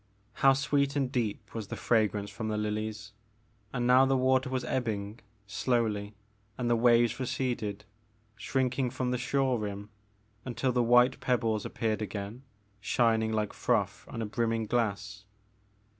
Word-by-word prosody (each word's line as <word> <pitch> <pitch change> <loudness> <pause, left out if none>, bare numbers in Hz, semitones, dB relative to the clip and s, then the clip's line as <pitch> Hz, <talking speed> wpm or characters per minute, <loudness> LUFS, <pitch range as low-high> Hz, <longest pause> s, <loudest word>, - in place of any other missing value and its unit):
How 135 0 +7
sweet 140 +1 +1
and 135 -3 0
deep 115 -6 -3
was 110 -3 -5
the - - -5
fragrance 105 -3 +1
from 110 - -5
the 105 -1 -1
lilies. 105 0 -3 0.6
And 125 -2 -1
now 125 +2 +6
the 135 0 +3
water 130 0 +2
was 130 -1 -2
ebbing, 110 -4 -2 0.3
slowly, 105 -1 -1 0.4
and 125 - -2
the 120 - +3
waves 120 0 +4
receded, 115 -5 -2 0.5
shrinking 130 +1 0
from 125 +1 -2
the 125 - -1
shore 130 -1 +1
rim 105 0 -5 0.5
until 130 +1 -1
the 125 0 +2
white 125 +2 +4
pebbles 115 -4 0
appeared 110 -1 -2
again, 105 +3 -5 0.4
shining 110 +2 +2
like 105 -2 -1
froth - - 0
on 115 - -5
a - - -2
brimming 115 +1 -1
glass. 100 -3 -2
115 Hz, 145 wpm, -30 LUFS, 105-125 Hz, 0.6 s, How